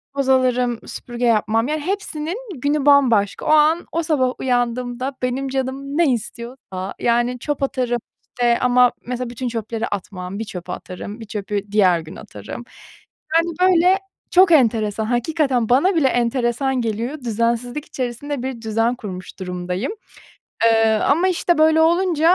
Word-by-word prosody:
toz 275 -1 0
alırım, 250 -2 +2
süpürge 240 0 -5
yapmam. 225 +1 +2
Yani, 305 0 -2
hepsinin 355 -1 -3 0.2
günü 290 0 0
bambaşka. 245 -8 +4
O - - -1
an, 310 +2 +4
o 335 +1 -1
sabah 260 -6 +1
uyandığımda 245 +1 -1
benim 255 +2 -1
canım 270 +2 -3
ne 335 -5 +4
istiyorsa, 235 -4 -6
yani, 240 +1 +1
çöp 290 +1 -3
atarım, 245 -3 -1 0.3
işte, 240 -1 +1
ama 250 0 +4 0.2
mesela 250 -1 -3
bütün 245 +1 -4
çöpleri 225 0 -3
atmam. 190 -1 -5
Bir 225 - -3
çöpü 180 -3 -7
atarım, 200 +5 -7
bir 225 - -8
çöpü 205 -1 -3
diğer 185 -5 +4
gün 160 +2 -10
atarım. 105 - -9 0.7
Yani, 340 +1 +1
böyle 370 +1 +5 0.3
çok 365 -1 +6
enteresan, 220 -6 +3
hakikaten 250 0 0
bana 335 +10 +4
bile 290 -5 +4
enteresan 245 +1 0
geliyor. 230 +6 -3
Düzensizlik 235 +5 -1
içerisinde 255 +2 -4
bir 260 -3 -5
düzen 225 +2 0
kurmuş 190 -6 -8
durumdayım, 180 - -3 0.7
eee, 225 -1 +5
ama, 325 - +2
işte, 345 -2 +1
böyle 315 +1 +5
olunca 340 0 +4
245 Hz, 145 wpm, -20 LUFS, 225-290 Hz, 0.7 s, çok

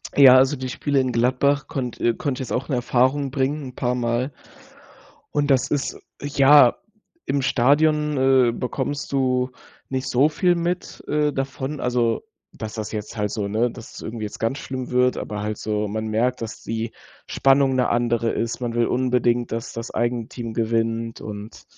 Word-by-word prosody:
Ja, 130 -2 +9
also 135 +2 +4
die 130 -1 -5
Spiele 140 +2 0
in 130 -1 +1
Gladbach 130 +4 +1
konnt 125 -4 -4
äh, 120 - +2
konnte 135 +2 -3
ich 130 - -5
jetzt - - -3
auch 130 +4 -3
'ne 135 - +1
Erfahrung 130 +3 +1
bringen 140 +2 -1
'n 125 - -14
paar 125 0 0
Mal 120 +3 -1 1.0
und 145 -1 +1
das 130 -2 +2
ist, 145 -2 -1 0.2
ja, 140 -2 +6 0.5
im 140 - 0
Stadion, 145 +4 +2
äh, 130 -2 +4
bekommst 130 +4 -3
du 130 -2 +1 0.4
nicht 130 0 -2
so 135 +4 +3
viel 175 +3 +2
mit, 175 +1 -3
äh, 150 0 +1
davon, 135 +2 -3
also, 120 -2 0 0.3
dass 110 -1 -7
das 110 -2 -4
jetzt 110 +1 -6
halt 105 -1 -1
so 105 -2 -2
ne, 115 +4 +1
dass 115 -1 -11
es - - -8
irgendwie 110 0 -6
jetzt 105 - -8
ganz 115 +5 -1
schlimm 130 -2 -5
wird, 125 0 +3
aber 105 -1 -4
halt 105 0 -3
so 105 -1 -2
man 110 +2 -3
merkt, 120 +4 0
dass 115 -1 -6
die 115 +1 -3 0.4
Spannung 135 -1 +3
'ne 125 -1 +2
andere 120 -1 +1
ist. 115 0 -2
Man 120 -1 -2
will 120 0 +2
unbedingt, 125 -1 +1
dass 115 +1 -4
das 115 0 -6
eigene 120 -1 -1
Team 115 -2 -6
gewinnt 115 0 -1
und 105 +1 -8
125 Hz, 185 wpm, -23 LUFS, 115-135 Hz, 1.0 s, Ja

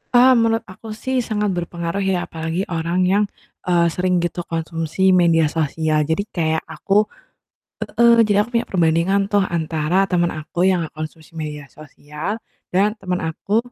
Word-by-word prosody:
Mmm, 255 +2 +7
menurut 225 0 +1
aku 205 +4 -12 0.2
sih, 260 0 0
sangat 210 -3 -1
berpengaruh 170 +1 -3
ya, 185 - +1
apalagi 160 +3 -3
orang 165 +2 -1
yang, 205 +2 +3 0.4
eee, 175 -1 +3
sering 180 0 0
gitu 175 +1 -2
konsumsi 165 +2 0
media 170 -3 +4
sosial. 155 0 0
Jadi 160 +5 0
kayak 160 -2 0
aku 195 +6 +1 0.8
heeh, 235 0 +4
jadi 205 -1 +2
aku 215 - -8
punya 235 - -3
perbandingan 170 +2 +2
tuh 205 -1 +4
antara 165 +2 0
temen 175 -1 +2
aku 155 +3 -1
yang 185 -2 +2
gak - - -15
konsumsi 155 0 -8
media 150 -2 -5
sosial 150 +5 -6 0.4
dan 200 +3 +3
temen 180 -2 -2
aku 165 +6 -1
170 Hz, 160 wpm, -20 LUFS, 160-195 Hz, 0.8 s, Mmm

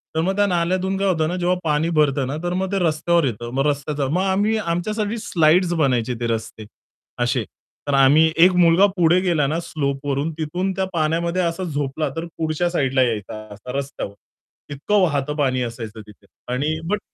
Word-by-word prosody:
तर 160 - +2
मग 190 +3 0
त्या 205 0 +3
नाल्यातून 185 +2 0
काय 195 0 0
होतं 160 -4 +1
ना, 175 - -2
जेव्हा 180 0 +1
पाणी 155 +1 +1
भरत 150 -4 +2
ना, 135 - -3
तर 175 0 -1
मग 190 +1 -2
ते 200 - 0
रस्त्यावर 170 -1 +2
येतं. 120 -1 -3
मग 135 +2 +1
रस्त्याचा 145 -1 -1
मग 170 +7 0
आम्ही 200 +3 +1
आमच्यासाठी 210 +4 -2
स्लाइड्स 175 -1 +2
बनायचे 130 -7 +1
ते 120 - -1
रस्ते 110 -1 -4 0.6
अशे 120 0 0 0.4
तर 145 - 0
आम्ही 155 +4 +5
एक 175 +3 +7
मुलगा 175 +2 +5
पुढे 175 +1 +4
गेला 170 -6 +1
ना, 155 +4 -1
स्लोप 140 -4 -3
वरून 140 +3 -1
तिथून 175 +5 -2
त्या 190 0 0
पाण्यामध्ये 170 +2 0
असा 170 +1 -2
झोपला 145 -2 -2
तर 165 +1 -3
पुढच्या 160 +2 0
साइडला 135 -6 +1
यायचा 110 -2 -3
असा 110 +5 -9
रस्त्यावर. 140 -7 -5 0.6
इतकं 145 +9 0
वाहतं 150 -4 0
पाणी 130 -4 0
असायचं 115 -2 -6
तिथे 105 -1 -17 0.3
आणि 150 +5 -1
बट 210 +1 0
160 Hz, 185 wpm, -21 LUFS, 135-180 Hz, 0.6 s, एक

